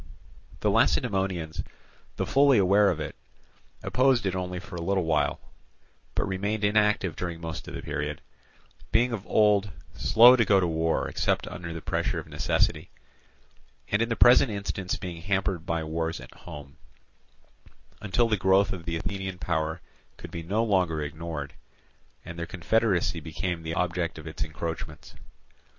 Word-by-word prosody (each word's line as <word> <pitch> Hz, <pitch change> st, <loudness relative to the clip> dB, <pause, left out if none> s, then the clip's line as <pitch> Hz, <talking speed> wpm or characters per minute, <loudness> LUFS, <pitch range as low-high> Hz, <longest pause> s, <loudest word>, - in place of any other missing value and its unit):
The -, -, +2 dB
Lacedaemonians, 95 Hz, -5 st, +1 dB, 0.5 s
though -, -, -1 dB
fully 140 Hz, -2 st, +4 dB
aware 100 Hz, +1 st, +5 dB
of 85 Hz, -, -1 dB
it, 75 Hz, -, -5 dB, 0.7 s
opposed 130 Hz, -4 st, +2 dB
it 95 Hz, -, 0 dB
only 90 Hz, 0 st, -3 dB
for 90 Hz, -, -10 dB
a 85 Hz, -, -4 dB
little 95 Hz, +2 st, +1 dB
while, 80 Hz, -2 st, +1 dB, 0.8 s
but -, -, 0 dB
remained 100 Hz, +3 st, -2 dB
inactive 105 Hz, -4 st, +2 dB
during 85 Hz, -2 st, -4 dB
most 80 Hz, -1 st, -6 dB
of -, -, -7 dB
the -, -, -6 dB
period, -, -, -3 dB, 0.7 s
being 120 Hz, +3 st, +3 dB
of 105 Hz, -3 st, -5 dB
old 105 Hz, -2 st, +3 dB, 0.2 s
slow 115 Hz, -, +7 dB
to 120 Hz, -, +3 dB
go 100 Hz, -3 st, +4 dB
to 95 Hz, -, +2 dB
war 80 Hz, -1 st, 0 dB
except -, -, 0 dB
under 85 Hz, -1 st, -6 dB
the 80 Hz, -1 st, -7 dB
pressure -, -, -1 dB
of -, -, -5 dB
necessity, -, -, 0 dB, 1.0 s
and 100 Hz, -, +2 dB
in 115 Hz, -, +1 dB
the 115 Hz, -, 0 dB
present 120 Hz, +3 st, +6 dB
instance 100 Hz, -2 st, -3 dB
being 85 Hz, -3 st, -7 dB
hampered 95 Hz, -2 st, -1 dB
by 85 Hz, -1 st, -1 dB
wars 80 Hz, +1 st, -2 dB
at -, -, -12 dB
home; 70 Hz, -1 st, -11 dB, 1.2 s
until 110 Hz, +4 st, +2 dB
the 110 Hz, -2 st, +1 dB
growth 95 Hz, +1 st, +3 dB
of 85 Hz, -3 st, -8 dB
the 85 Hz, -, -2 dB
Athenian 95 Hz, +1 st, -4 dB
power 80 Hz, -1 st, -2 dB, 0.4 s
could -, -, -10 dB
be 85 Hz, -, -5 dB
no 100 Hz, +7 st, 0 dB
longer 90 Hz, -8 st, +1 dB
ignored, 75 Hz, -2 st, -5 dB, 0.7 s
and 85 Hz, 0 st, -8 dB
their 85 Hz, -, -2 dB
own -, -, -9 dB
confederacy 95 Hz, -2 st, +1 dB
became 85 Hz, +2 st, -4 dB
the 80 Hz, 0 st, -4 dB
object 90 Hz, -1 st, -1 dB
of 80 Hz, -, -9 dB
its 80 Hz, -, -8 dB
encroachments. 80 Hz, 0 st, -6 dB
90 Hz, 160 wpm, -27 LUFS, 80-100 Hz, 1.2 s, slow